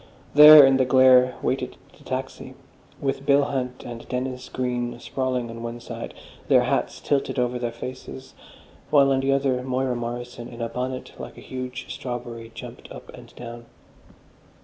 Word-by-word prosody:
There 150 0 +11
in 135 0 +4
the 130 - +2
glare 130 -1 +5
waited - - -2 0.2
the - - -20
taxi, - - -6 0.4
with 135 0 -2
Bill 140 +1 +4
Hunt 130 -3 -3
and 120 -1 -9
Dennis 130 0 -4
Green 120 -1 -3
sprawling 130 -1 -2
on 115 0 -8
one 115 0 -6
side, 120 - -8 0.3
their - - +5
hats - - -1
tilted 140 -1 -1
over 125 0 0
their 120 -1 -2
faces, 130 +2 -9 0.6
while 140 -2 +5
on 135 - +2
the 135 +1 +1
other, 135 -2 +1
Moira 130 0 -1
Morrison, 120 0 -6
in 120 -1 -11
a 115 0 -3
bonnet 130 +1 -4
like - - -9
a - - -11
huge 130 0 -6
strawberry, 120 -2 -7
jumped - - -10
up - - -11
and - - -14
down. 120 0 -9
125 Hz, 165 wpm, -24 LUFS, 120-130 Hz, 0.6 s, There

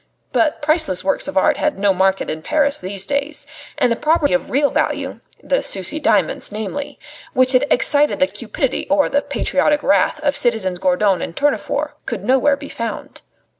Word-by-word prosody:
But 310 -1 +1
priceless 305 - +1
works 285 - 0
of 285 - -4
art 190 - +3
had - - -1
no 200 0 +2
market 190 +1 +1
in 155 0 -4
Paris 285 - +1
these 190 +1 -3
days; 285 +4 -2 0.3
and 245 - +2
the - - +2
property 305 0 +1
of 270 - 0
real 285 +2 +2
value - - -2 0.2
the - - +1
Sucy 195 - -1
diamonds 210 - +1
namely 220 +7 -5 0.4
which 255 0 +3
had 265 +2 +3
excited 290 +3 +2
the 280 - +5
cupidity 260 0 -3
or 290 0 +3
the 285 - +1
patriotic 295 0 0
wrath 290 - +2
of 285 -1 +1
citizens 205 -7 0
Gourdon 190 +1 +2
and 165 - -5
Tournefort 290 +1 -1 0.2
could - - -4
nowhere 265 +2 +3
be 285 0 -9
found. 230 -4 -6
270 Hz, 175 wpm, -19 LUFS, 195-290 Hz, 0.4 s, the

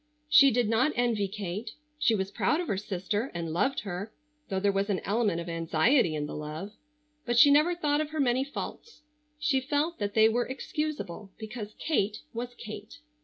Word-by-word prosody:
She 280 -2 +8
did 245 -2 +1
not 250 +7 +2
envy 235 -4 +1
Kate. 205 +2 -5 0.2
She 230 -6 +3
was 190 -1 -2
proud 300 +9 +1
of 355 - -3
her - - 0
sister, 205 +4 -2
and 165 -2 -3
loved 205 +11 +1
her, 200 +1 -5 0.4
though 190 -2 0
there 200 +1 +2
was 195 +1 -1
an 195 - +1
element 205 -4 0
of 170 - -6
anxiety 165 - +2
in 150 -1 -2
the - - -6
love. 155 +6 -6 0.5
But 240 -1 0
she 285 +4 +8
never 305 +5 +4
thought 295 -3 +1
of 305 - -3
her 310 0 -4
many 255 -1 +2
faults. 300 +5 -7 0.3
She 295 -3 +1
felt 295 +5 -1
that 205 -1 -2
they 220 0 +7
were 240 +2 +1
excusable 265 - -4
because 215 -1 -7
Kate 215 -9 0
was 245 +1 -5
Kate. 215 +1 -9
220 Hz, 190 wpm, -29 LUFS, 195-275 Hz, 0.5 s, She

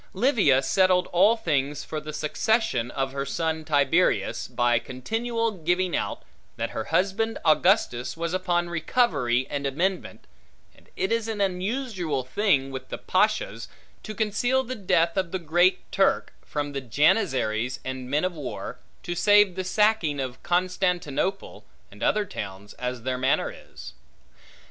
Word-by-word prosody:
Livia 195 - +3
settled 185 +2 +3
all 200 +6 +5
things 145 -7 -1
for 155 - -4
the 155 0 -7
succession 150 - 0
of 135 +1 -2
her 140 0 -3
son 160 +3 -2
Tiberius, 150 +3 +1
by 120 -1 +2
continual 225 - -2
giving 180 0 0
out, - - -3 0.3
that 115 0 -3
her 110 - -4
husband 195 +6 0
Augustus 155 - +2
was 170 +1 -3
upon 175 -2 0
recovery 155 - +1
and 140 -1 -2
amendment, 180 +7 -2 0.5
and - - -24
it 190 - -1
is 230 -1 0
an 200 -5 -1
usual 190 - -2
thing 135 -2 +1
with 130 -1 -7
the - - -4
pashas, - - 0 0.3
to 215 - -7
conceal 245 +5 +1
the 255 0 -5
death 170 -6 +1
of 185 -3 0
the 190 - -1
Great 175 +2 +1
Turk 195 - +1
from 145 -1 -3
the 140 - -3
janizaries 130 - +1
and 130 -1 -5
men 150 +5 +1
of 185 - -1
war, 145 -7 -6 0.2
to 175 - -3
save 205 +1 +5
the 185 +1 -3
sacking 185 -6 +2
of 130 -2 -4
Constantinople 180 -1 -1 0.3
and - - -15
other 210 -1 +2
towns, 100 - -7
as 125 -1 -5
their 130 0 -2
manner 130 +1 +1
is. - - -12
170 Hz, 150 wpm, -25 LUFS, 135-195 Hz, 0.5 s, all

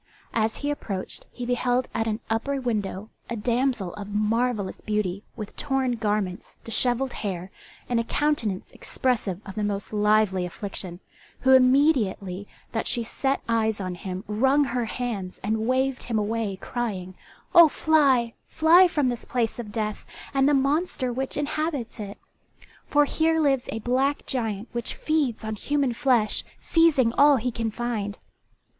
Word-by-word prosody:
As 220 -1 +1
he 290 0 -2
approached 195 -9 -5
he 245 - -6
beheld 245 +1 +1
at 225 0 0
an 220 +1 -2
upper 270 +5 -1
window 215 -4 -3 0.2
a 235 - -2
damsel 235 -3 0
of 205 -1 -7
marvellous 215 0 0
beauty, 210 -2 -1
with 215 -3 -7
torn 270 -3 0
garments, 210 -5 -2
dishevelled 245 +3 0
hair, 185 -3 -4 0.4
and 240 -1 +1
a - - +1
countenance 230 -8 -1
expressive 220 -8 -1
of 195 - -7
the 210 - -2
most 205 0 -3
lively 210 -3 +3
affliction, 180 0 -6 0.4
who 265 0 +5
immediately 255 - +3 0.2
that 225 - -2
she 235 - 0
set 270 +4 -1
eyes 220 -2 +1
on 185 -2 -3
him 185 +1 -6
wrung 265 +7 +3
her 250 -3 -1
hands 220 -6 -4
and 220 +2 0
waived 260 +1 +1
him 230 -2 -2
away 215 -1 -1
crying 190 -4 -4 0.4
"Oh, 340 -2 +10
fly, 275 -7 +3
fly 335 +4 +6
from 295 -6 +1
this 240 -2 -2
place 235 -1 -1
of 215 -3 -6
death 215 -1 -3 0.3
and 270 0 +4
the 290 - +4
monster 275 -2 0
which 265 +2 -3
inhabits 290 -5 -2
it! 205 -1 -6 0.7
For 295 0 +4
here 320 +2 +1
lives 275 -5 +2
a - - -3
black 260 +5 0
giant 225 -4 -2
which 235 -1 -3
feeds 295 -9 0
on 220 0 -3
human 275 +3 0
flesh, 235 -3 +2 0.2
seizing 305 -8 +3
all 290 0 +7
he 250 0 -1
can 230 -1 -2
find. 215 -3 -3
235 Hz, 155 wpm, -25 LUFS, 210-270 Hz, 0.7 s, Oh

